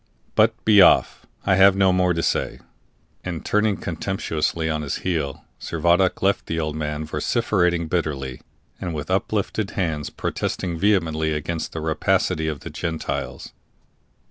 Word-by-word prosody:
But 110 +1 +2
be 105 -2 +7
off! - - +4 0.2
I 95 -2 +3
have 95 0 +7
no 95 -1 +4
more 90 -1 +2
to 85 - -1
say." - - -1 0.6
And, 85 -3 -5
turning 105 -2 +2
contemptuously 80 -2 -2
on 80 -1 -1
his 70 -2 -3
heel, 80 -7 -2
Servadac 85 +4 +1
left 100 +1 +1
the 80 - -2
old 75 -1 -2
man 75 0 -3
vociferating 90 - 0
bitterly, 70 -7 -2 0.4
and 85 -2 -4
with 75 +3 -5
uplifted 100 +1 -1
hands 80 -6 -1
protesting 85 -3 -3
vehemently 80 -6 +1
against 80 +2 -3
the 80 - -4
rapacity 80 0 0
of 75 -3 -3
the - - -8
Gentiles. 70 -5 -4
85 Hz, 145 wpm, -23 LUFS, 75-95 Hz, 0.6 s, be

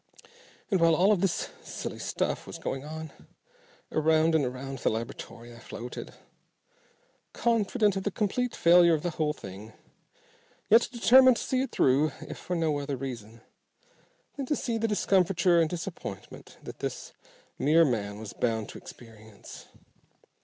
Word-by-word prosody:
And 190 - +3
while 165 -1 +5
all 195 +5 +4
this 195 -1 -1
silly - - -6
stuff - - -2
was - - -7
going 135 0 -4
on, 160 +1 -7 0.8
around 160 +1 +3
and 160 -2 +3
around 130 +1 -5
the - - +1
laboratory 115 +1 -6
I - - -13
floated, 120 +2 -8 1.2
confident 220 -2 +1
of 195 - -2
the 205 - -1
complete 225 +5 -1
failure 170 0 +6
of 150 - -5
the 175 - -1
whole 155 -1 0
thing, 105 -2 -10 1.0
yet 230 +2 +6
determined 255 +1 +6
to - - -4
see 260 -1 0
it 270 - -3
through 135 +3 +2
if - - -8
for 180 - -4
no 160 -3 0
other 140 -1 -4
reason 115 -4 -7 1.0
than 275 -2 -4
to 300 - +1
see 230 -4 -2
the 225 - +1
discomfiture 185 -4 +3
and 160 - +1
disappointment 170 - -7
that - - -9
this - - -5 0.5
mere 160 +3 +5
man 105 -6 -2
was 110 -1 -8
bound 110 -3 -1
to - - -9
experience. 110 -3 -13
160 Hz, 150 wpm, -28 LUFS, 125-195 Hz, 1.2 s, failure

